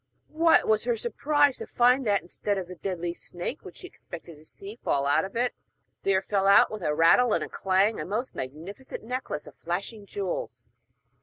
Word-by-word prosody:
What 325 +1 +4
was 220 +1 +2
her 240 -1 +1
surprise 285 +5 +1
to - - -7
find 250 +1 +3
that, 200 -2 +2
instead 200 +3 -3
of 185 -2 -4
the 180 - -8
deadly 175 -1 -3
snake 175 0 -6
which 175 - -11
she - - -9
expected 170 -1 -11
to 155 - -18
see 200 +7 -10
fall 140 0 +1
out 150 +5 +3
of 195 - -10
it, 245 +1 +1 0.5
there 195 -1 +2
fell 195 -1 +1
out 200 - +6
with 215 -2 -6
a 150 -3 0
rattle 190 +9 +5
and - - +1
a - - -5
clang 195 +3 +1
a - - -2
most 220 +7 -3
magnificent 165 - -7
necklace 250 - -4
of - - -12
flashing 200 +5 -4
jewels! - - -5
200 Hz, 200 wpm, -27 LUFS, 175-240 Hz, 0.5 s, out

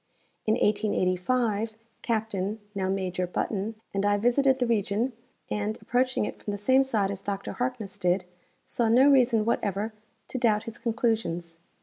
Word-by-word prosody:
In 215 - +4
1885 210 +1 +1 0.3
Captain 215 -2 -1
(now 190 -2 -1
Major) 185 -2 -1
Button 205 +4 -2 0.2
and 195 0 0
I 205 0 +3
visited 260 +5 +3
the 250 - +1
region 225 +2 0 0.4
and, 210 +1 -1
approaching 255 -2 +1
it - - -7
from - - -6
the 205 - -2
same 260 +6 +4
side 215 -7 0
as 195 -1 -6
Dr 200 -1 -3
Harkness 245 -5 -3
did, 180 +1 +1 0.4
saw 235 -2 0
no 255 +5 +6
reason 250 -6 +4
whatever 210 -1 -1 0.4
to 255 - -3
doubt 215 -3 +3
his 230 - -8
conclusions. 220 -8 -1
215 Hz, 150 wpm, -27 LUFS, 200-240 Hz, 0.4 s, no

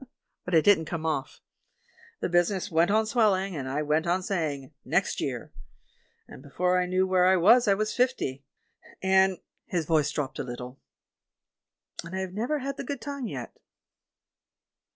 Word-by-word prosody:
But 180 - 0
it 160 - +5
didn't 200 -6 +5
come 160 0 -5
off. 150 -4 -3 0.8
The - - 0
business 175 +2 +1
went 165 +2 +3
on 220 +2 +3
swelling, 200 -5 +1
and 130 -3 -4
I 145 +3 -1
went 155 +3 0
on 180 +2 +1
saying, 155 -8 -3
'Next - - 0
year.' - - -4 0.7
And - - -12
before 180 +6 0
I 180 - -1
knew 185 +1 +2
where 185 -1 +3
I 190 - +5
was 230 +7 +5
I 200 - +5
was 215 +1 -1
fifty, 245 - 0 0.6
and" 190 0 +4 0.2
— - - -52
his 165 -3 +1
voice 155 -2 +2
dropped 140 -3 -4
a - - -1
little 125 +1 -8 0.6
— - - -15
"and 170 +3 -7
I - - -2
have 185 -1 -5
never 240 +9 -1
had 275 0 -4
the - - -4
good 280 -2 -5
time 280 -1 -5
yet." - - -7
180 Hz, 175 wpm, -27 LUFS, 155-205 Hz, 0.8 s, it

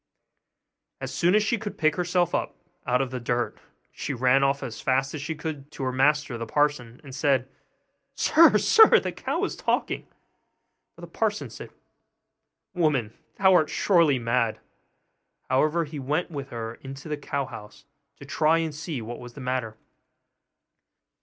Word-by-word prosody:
As - - -5
soon 175 +3 +2
as 215 - +4
she 230 +1 0
could 205 -2 -6
pick 155 -2 +2
herself 175 -1 0
up - - -2 0.3
out 125 +1 +2
of 130 - -6
the 130 - -4
dirt, 120 0 -2 0.3
she 140 - -4
ran 130 +2 +3
off 135 0 +1
as 115 -2 -6
fast 135 +1 0
as 150 - -5
she 160 +2 -4
could 150 -3 -6
to 135 - -6
her 130 - 0
master 135 -1 +1
the 115 - -5
parson, 145 -4 0
and 135 -3 -11
said, 135 -1 +1 0.7
'Sir, 330 +1 +5
sir, 445 -1 +6
the - - -4
cow - - -3
is - - -2
talking!' - - -1 0.9
But - - -15
the - - -8
parson - - -2
said, - - -9 1.0
'Woman, 150 - 0 0.2
thou 190 -1 +4
art 155 -4 +4
surely 170 -8 +3
mad!' 115 -1 0 0.9
However, 155 +5 +2
he 150 0 -7
went 150 +7 -2
with 140 -3 -6
her 115 -1 -6
into 135 +2 -9
the 150 - -2
cow 140 -1 -3
house, 110 -5 -11 0.3
to 140 - -12
try 155 +3 +2
and 165 -2 -2
see 150 -4 -5
what 120 +2 -7
was 120 -1 -10
the - - -9
matter. 125 -4 -3
140 Hz, 165 wpm, -26 LUFS, 125-160 Hz, 1.0 s, sir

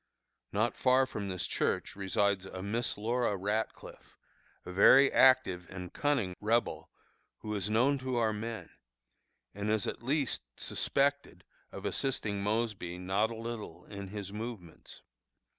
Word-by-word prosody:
Not 110 +4 +1
far 130 +1 +4
from 105 -6 -5
this 90 -2 -2
church - - -1
resides 100 0 0
a 95 -1 -7
Miss 115 +4 -1
Laura 115 0 0
Ratcliffe, 105 +4 -4 0.5
a 90 - -6
very 130 +9 +7
active 95 -9 +4
and 90 -1 -7
cunning 135 -11 0
Rebel, 115 +3 0 0.5
who 105 - -4
is 100 -1 -2
known 130 +6 +3
to 130 -1 -3
our 115 -2 +2
men, 115 +2 -5 0.8
and 100 +1 -3
is 110 -2 +2
at - - -4
least 135 +2 0 0.2
suspected 140 +1 0 0.3
of - - -8
assisting 110 -7 -1
Mosby 105 -4 -1
not 95 +4 +1
a 115 - -6
little 115 -1 -7
in 100 -1 -7
his 100 0 -6
movements. 105 -6 -8
105 Hz, 140 wpm, -31 LUFS, 100-120 Hz, 0.8 s, very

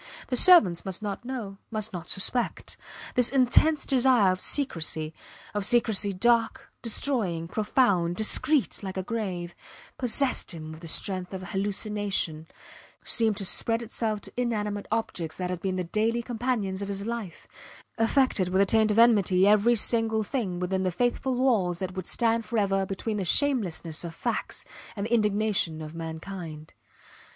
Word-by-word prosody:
The 250 - 0
servants 235 - +6
must 190 +2 -2
not 205 +2 -4
know 225 -7 -6
must 215 -1 -3
not 175 -1 -7
suspect. 235 +5 -1 0.4
This 250 -1 +3
intense 275 +4 +3
desire 250 -7 +3
of 185 - -3
secrecy; 160 - -2 0.4
of 205 -1 -2
secrecy 215 -2 +3
dark, 230 +4 +1
destroying, 215 -9 0
profound, 200 -4 +1
discreet 220 - +3
like 190 -2 -6
a 190 - -2
grave, 185 -6 -4 0.5
possessed 255 -5 +1
him 155 -1 -8
with 160 +1 -11
the 170 - -9
strength 185 +2 -2
of 185 - -7
a - - -7
hallucination 195 -4 -2 0.6
seemed 220 -3 +4
to 195 - -3
spread 230 +5 +1
itself 220 -2 -2
to - - -9
inanimate 210 -4 -2
objects 185 -8 -3
that 180 -1 -3
had 180 -2 -5
been 190 -1 -2
the 185 - -2
daily 220 +6 -1
companions 225 -5 -2
of 200 - -4
his 200 0 -4
life, 225 -7 -6 0.5
affected 225 -5 +2
with 190 +1 +1
a 200 - +5
taint 220 +1 +2
of 210 - 0
enmity 200 -5 +4
every 215 +3 +4
single 225 0 +2
thing 200 -6 -3
within 185 +1 -1
the 185 - 0
faithful 245 +6 -1
walls 220 -9 +1
that 185 0 -5
would 185 -1 -6
stand 230 -1 +1
forever 195 -4 0
between 210 +2 -4
the 195 - -2
shamelessness 180 - 0
of 165 -1 -7
facts - - -3 0.3
and 200 -1 -3
the 230 - -3
indignation 210 -6 +1
of 155 0 -8
mankind. 165 -1 -8
205 Hz, 160 wpm, -26 LUFS, 185-230 Hz, 0.6 s, servants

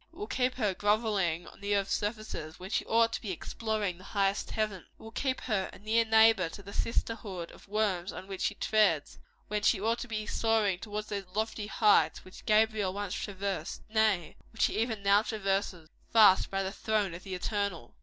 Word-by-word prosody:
It - - -20
will 415 - -4
keep 255 -8 0
her 210 -6 0
grovelling 205 -5 +1
on - - -14
the 205 0 +1
earth's 195 -1 0
surface, 205 -7 -4
when 185 +2 -8
she - - +1
ought 230 0 +3
to - - -3
be 220 - -5
exploring 205 0 -3
the - - -13
highest 195 0 0
heavens. 215 -5 -2
It - - -34
will 220 - -10
keep 260 +3 -1
her 210 -6 -1
a - - -12
near 220 +3 +2
neighbor 220 -5 +5
to 200 - -10
the 200 +1 -10
sisterhood 205 -7 -3
of - - -16
worms 200 -3 0
on - - -8
which 195 -1 -7
she 205 - 0
treads, 200 -11 +2 0.3
when 210 0 -1
she 210 0 +3
ought 225 +3 0
to 245 - -5
be 215 -2 -3
soaring 215 -4 +1
towards 210 0 -5
those 200 -3 -4
lofty 220 -1 -2
heights 205 -8 +3
which 185 - -13
Gabriel 215 -3 +3
once 200 -1 -3
traversed 200 -1 -4
nay, 215 -6 +1
which 225 - +2
he - - -1
even 225 -3 -1
now 200 +1 +5
traverses 195 -6 -2 0.2
fast 210 -4 +6
by 195 0 -1
the 190 - -3
throne 210 -3 -1
of 170 - -8
the 190 -1 -5
Eternal. 200 - -3
205 Hz, 205 wpm, -30 LUFS, 190-220 Hz, 0.3 s, fast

